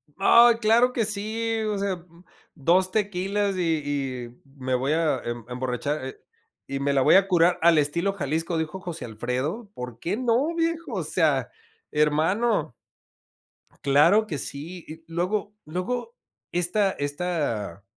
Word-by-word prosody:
¡Ay, 235 +4 +6
claro 235 +3 +3
que 230 -3 +1
sí! 220 +2 -1
O 205 - -1
sea, 190 -3 -2 0.5
2 180 +6 +2
tequilas 200 -1 0
y - - 0 0.7
y 120 - -19 0.2
me 130 -1 -3
voy 135 +4 0
a 155 -5 +1
em 120 -1 -5
emborrachar, 130 +3 -3
eh, 130 - -7 0.5
y 135 0 -4
me 140 0 0
la 135 - +3
voy - - +5
a 195 0 +5
curar 175 -1 +3
"al 165 -1 +5
estilo 170 +7 +1
Jalisco", 165 0 -2
dijo 160 +4 -3
José 175 -5 -6
Alfredo, 130 - -3
¿por 125 - -8
qué 185 +5 -2
no, 255 +6 +1
viejo?, 330 -4 -1
o 185 -5 -2
sea, 150 -5 +1 0.4
hermano, 155 - +1 1.1
claro 160 +10 +4
que 150 -7 -3
sí. 160 +7 -5
Y 160 +1 -10
luego 190 +5 -2
luego 245 - -4 0.4
esta 185 +3 +1
esta 145 - -3
175 Hz, 145 wpm, -25 LUFS, 145-205 Hz, 1.1 s, Ay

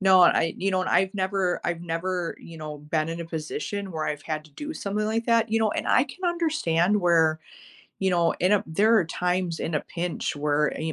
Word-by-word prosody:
No, 190 -1 +6
I 165 -1 +4
you 195 +1 0
know, 185 -1 +1
and - - -3
I've 190 +1 +2
never 190 -2 0
I've 170 -1 -1
never, 175 +1 -3
you 165 -1 -11
know, 150 -1 -6
been 155 +2 -1
in 165 +1 -4
a 170 - -4
position 165 +4 -4
where 155 -1 -2
I've 150 -1 -3
had 155 -1 -4
to 155 - -18
do 295 - -7
something 210 +1 -2
like 225 +1 -1
that, 230 -1 +3
you 225 - +2
know, 220 -1 +2
and - - -3
I 255 - +4
can 370 +4 -9
understand 210 - +1
where, 165 -3 +3 0.6
you 190 -1 +1
know, 170 -2 +3
in 185 +3 +3
a 205 - +3
there 210 +8 +3
are 180 - +2
times, 180 0 -1
in 160 - -3
a 150 - +1
pinch, 170 -3 -3
where, 150 0 +1
a 160 0 -3
175 Hz, 230 wpm, -25 LUFS, 160-200 Hz, 0.6 s, No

